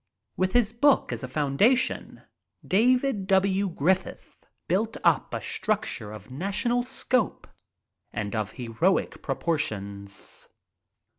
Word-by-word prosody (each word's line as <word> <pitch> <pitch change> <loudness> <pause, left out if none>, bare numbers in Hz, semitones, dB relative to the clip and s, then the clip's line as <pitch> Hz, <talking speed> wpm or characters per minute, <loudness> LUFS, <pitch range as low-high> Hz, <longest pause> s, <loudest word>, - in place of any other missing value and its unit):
With 185 0 0
this 235 -3 +3
book 275 +4 +3
as - - -5
a 130 - -4
foundation, 150 - +1 0.4
David 245 0 +2
W. 195 0 +3
Griffith 180 +3 -1 0.2
built 215 +5 0
up - - +3
a - - -2
structure 130 - -2
of 110 +4 -10
national 200 - 0
scope 255 -2 -1 0.7
and 105 0 -3
of 110 -2 -2
heroic 125 +10 0
proportions. 100 -11 -3
190 Hz, 105 wpm, -27 LUFS, -, 0.7 s, this